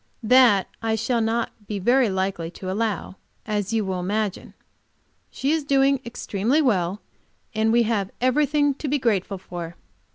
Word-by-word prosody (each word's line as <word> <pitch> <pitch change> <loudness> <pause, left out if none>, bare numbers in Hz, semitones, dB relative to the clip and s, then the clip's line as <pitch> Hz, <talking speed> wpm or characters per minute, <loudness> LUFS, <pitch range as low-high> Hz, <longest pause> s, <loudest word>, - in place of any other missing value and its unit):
That 230 -4 +5
I 225 -1 0
shall 230 +2 0
not 225 +1 0 0.2
be 210 - -3
very 240 +5 +3
likely 190 -3 -2
to 185 +1 -6
allow, 205 -2 -2 0.3
as 210 -1 -2
you 220 -2 0
will 190 -1 -2
imagine. 205 +2 -3 0.7
She 275 +2 -1
is 320 -1 +1
doing 275 -1 +3
extremely 235 +3 -1
well, 200 - +1 0.5
and 220 0 +1
we 235 +1 +4
have 210 -4 -1
everything 290 +3 +2
to 290 +2 -6
be 290 +2 +1
grateful 205 -6 0
for. 175 -2 -7
220 Hz, 155 wpm, -23 LUFS, 195-255 Hz, 0.7 s, That